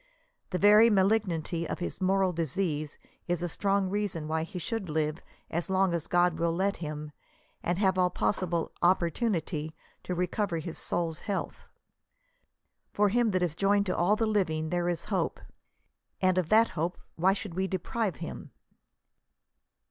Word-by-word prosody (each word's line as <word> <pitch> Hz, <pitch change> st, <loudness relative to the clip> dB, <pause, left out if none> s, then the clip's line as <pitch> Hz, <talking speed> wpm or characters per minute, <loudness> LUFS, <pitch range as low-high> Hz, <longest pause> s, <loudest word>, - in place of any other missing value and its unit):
The 180 Hz, -, -1 dB
very 210 Hz, +4 st, +7 dB
malignity 190 Hz, -5 st, +1 dB
of -, -, -2 dB
his 180 Hz, +2 st, -5 dB
moral 190 Hz, 0 st, +2 dB
disease 160 Hz, -2 st, -2 dB, 0.3 s
is 175 Hz, -1 st, -1 dB
a -, -, 0 dB
strong 195 Hz, +2 st, +1 dB
reason 190 Hz, -5 st, -2 dB
why 160 Hz, +1 st, 0 dB
he 180 Hz, +4 st, -6 dB
should 195 Hz, +1 st, -3 dB
live 155 Hz, 0 st, -1 dB, 0.3 s
as 170 Hz, +3 st, -2 dB
long 190 Hz, -1 st, +2 dB
as 170 Hz, -3 st, -2 dB
God 175 Hz, -2 st, +2 dB
will 170 Hz, 0 st, +2 dB
let 195 Hz, +3 st, 0 dB
him, 150 Hz, -2 st, -6 dB, 0.5 s
and 175 Hz, +1 st, -1 dB
have 190 Hz, -2 st, +2 dB
all 180 Hz, 0 st, +4 dB
possible 175 Hz, -2 st, -1 dB
opportunity 170 Hz, -3 st, +1 dB, 0.3 s
to 180 Hz, -, -3 dB
recover 180 Hz, 0 st, -1 dB
his 165 Hz, +1 st, -5 dB
soul's 165 Hz, -2 st, -1 dB
health. 200 Hz, -3 st, -4 dB, 1.2 s
For 205 Hz, 0 st, +3 dB
to -, -, -5 dB
him 240 Hz, -1 st, +3 dB
that 185 Hz, -3 st, +1 dB
is 170 Hz, -4 st, 0 dB
joined 200 Hz, +3 st, +2 dB
to 185 Hz, -, -1 dB
all 180 Hz, +5 st, +3 dB
the 225 Hz, +1 st, 0 dB
living 160 Hz, -7 st, 0 dB
there 175 Hz, 0 st, 0 dB
is 170 Hz, -1 st, -2 dB
hope," 180 Hz, -4 st, 0 dB, 0.8 s
and 185 Hz, -1 st, +3 dB
of 170 Hz, -3 st, -2 dB
that 225 Hz, +1 st, +5 dB
hope 170 Hz, +2 st, -2 dB, 0.2 s
why 185 Hz, +4 st, +3 dB
should 200 Hz, -2 st, -6 dB
we 190 Hz, +2 st, -1 dB
deprive 190 Hz, +1 st, -2 dB
him? -, -, -7 dB
180 Hz, 165 wpm, -29 LUFS, 165-195 Hz, 1.2 s, very